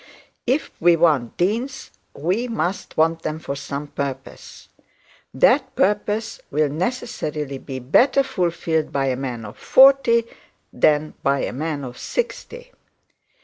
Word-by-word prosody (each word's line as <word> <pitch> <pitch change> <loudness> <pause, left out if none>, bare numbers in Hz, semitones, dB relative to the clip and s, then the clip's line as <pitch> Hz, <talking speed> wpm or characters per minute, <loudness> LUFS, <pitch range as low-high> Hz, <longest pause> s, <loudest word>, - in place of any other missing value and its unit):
If 265 +6 0
we 175 0 +5
want 150 -8 +2
deans, 230 +9 -2 0.2
we 185 - -1
must 195 -5 -3
want 165 +1 +2
them 155 - -3
for 150 -3 -5
some 140 +1 -5
purpose. 140 -2 -7 0.6
That - - +3
purpose 210 +2 0
will 150 0 +1
necessarily 150 - -3
be 135 -1 -7
better 240 - +3
fulfilled 170 - -1
by 140 -1 0
a 130 - 0
man 125 -4 -5
of 105 - -11
forty 265 -4 +5 0.5
than 150 0 +2
by 140 0 +1
a - - -3
man 150 +1 -3
of 125 -1 -8
sixty. - - -4
160 Hz, 130 wpm, -22 LUFS, 140-230 Hz, 0.6 s, we